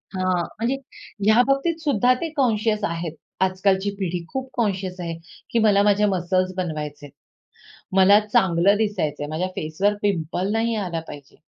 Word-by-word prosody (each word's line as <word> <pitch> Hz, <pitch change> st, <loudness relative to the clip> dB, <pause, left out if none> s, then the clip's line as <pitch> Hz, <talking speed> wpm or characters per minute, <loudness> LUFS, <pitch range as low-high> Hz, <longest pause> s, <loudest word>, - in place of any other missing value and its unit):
हां, 185 Hz, -1 st, 0 dB
म्हणजे 235 Hz, +4 st, 0 dB, 0.5 s
ह्या 220 Hz, +3 st, +6 dB
बाबतीत 275 Hz, +5 st, +1 dB
सुद्धा 255 Hz, -6 st, +3 dB
ते 335 Hz, -, -2 dB
कॉन्शियस 220 Hz, -4 st, +1 dB
आहेत. 170 Hz, -4 st, -3 dB, 0.3 s
आजकालची 190 Hz, +1 st, +1 dB
पिढी 180 Hz, -2 st, -2 dB
खूप 265 Hz, 0 st, -4 dB
कॉन्शियस 190 Hz, -5 st, -2 dB
आहे, 170 Hz, -2 st, -3 dB, 0.4 s
की 235 Hz, -, +2 dB
मला 200 Hz, -2 st, +5 dB
माझ्या 210 Hz, 0 st, +3 dB
मसल्स 185 Hz, -1 st, 0 dB
बनवायचे 150 Hz, -4 st, -4 dB
आहेत. 145 Hz, -, -13 dB, 0.9 s
मला 195 Hz, +2 st, +7 dB
चांगलं 190 Hz, -1 st, +3 dB
दिसायचं 205 Hz, -10 st, -1 dB
आहे, 145 Hz, -, -4 dB
माझ्या 170 Hz, +4 st, -2 dB
फेसवर 180 Hz, +7 st, 0 dB
पिंपल 185 Hz, -1 st, -1 dB
नाही 225 Hz, +1 st, 0 dB
आला 180 Hz, -5 st, -2 dB
पाहिजे. 145 Hz, -2 st, -11 dB
190 Hz, 150 wpm, -23 LUFS, 175-215 Hz, 0.9 s, मला